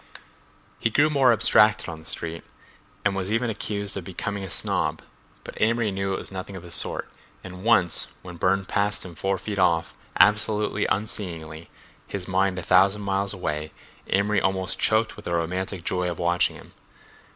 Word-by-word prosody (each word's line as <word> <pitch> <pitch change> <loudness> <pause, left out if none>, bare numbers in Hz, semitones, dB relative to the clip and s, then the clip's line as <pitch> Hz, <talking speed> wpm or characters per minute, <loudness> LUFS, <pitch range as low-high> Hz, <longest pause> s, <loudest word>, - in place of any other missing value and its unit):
He - - +1
grew 145 +7 +3
more 135 -4 +5
abstracted 105 -1 +4
on 80 -2 -6
the 80 - -16
street 85 0 -4 0.6
and 100 -1 +2
was 95 +1 -2
even 115 +1 +1
accused 100 -1 -3
of 100 - -4
becoming 100 +3 -4
a 95 - -6
snob, - - 0 0.4
but - - -9
Amory 115 -1 +2
knew 95 0 -2
it - - -1
was - - -7
nothing 95 +1 -6
of 95 - -8
the 85 - -10
sort, - - +1 0.4
and 90 0 -9
once 100 -7 +3 0.2
when 90 -2 -9
Burne 95 +2 +1
passed 100 +1 -1
him 90 - -9
four 95 +3 -1
feet 100 +2 -4
off, 85 -3 +2 0.3
absolutely 105 +1 +3
unseeingly, 85 -6 -4 0.4
his 95 -3 -5
mind 95 0 +1
a 90 - -4
thousand 95 +4 +4
miles 100 0 0
away, 75 -5 -3 0.4
Amory 100 0 +2
almost 95 -1 0
choked 110 +1 +2
with 105 - -12
the 85 - -2
romantic 90 +2 -2
joy 90 0 0
of 85 - -4
watching 85 0 +1
him. - - -14
95 Hz, 175 wpm, -25 LUFS, 90-105 Hz, 0.6 s, more